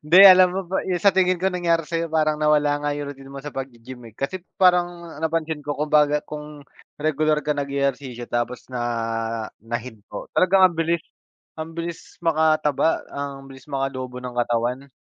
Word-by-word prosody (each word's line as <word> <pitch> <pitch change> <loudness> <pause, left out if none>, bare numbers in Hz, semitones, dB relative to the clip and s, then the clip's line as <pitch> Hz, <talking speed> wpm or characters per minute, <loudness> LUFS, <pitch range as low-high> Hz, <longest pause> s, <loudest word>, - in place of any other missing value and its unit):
Hindi 155 +5 +5
alam 185 -1 +9
mo 190 +2 -2
ba 190 +2 -1
'yong 180 -2 -1
sa 200 -2 +5
tingin 185 -1 +3
ko 190 - 0
nangyari 170 -3 0
sa'yo, 165 0 -2
parang 155 -1 +2
nawala 150 -1 +2
nga 145 - 0
'yong 145 -1 -5
routine 135 0 -13
mo 140 - -8
sa 145 +1 -8
pag-ge-gym 130 -1 -8
eh. - - -30
Kasi 175 +7 -3 0.2
parang 175 -2 +2
napansin 160 -2 -1
ko 145 0 -3
kumbaga 150 -1 +3
kung 150 -1 -8 0.4
regular 155 0 +1
ka 150 -1 +1
nag-ehersisyo 140 -3 -2
tapos 120 0 -2
na 125 -1 -3 0.8
nahinto, 115 -2 -6
talagang 190 +1 +4
ang 180 - -3
bilis, 165 0 0 0.6
ang 155 +1 -5
bilis 170 0 -7
makataba, 155 -2 +2
ang 140 -1 -5
bilis 135 0 -13
makalobo 130 -2 -3
ng 125 -1 -6
katawan. 120 +3 -1
150 Hz, 170 wpm, -23 LUFS, 135-165 Hz, 0.8 s, alam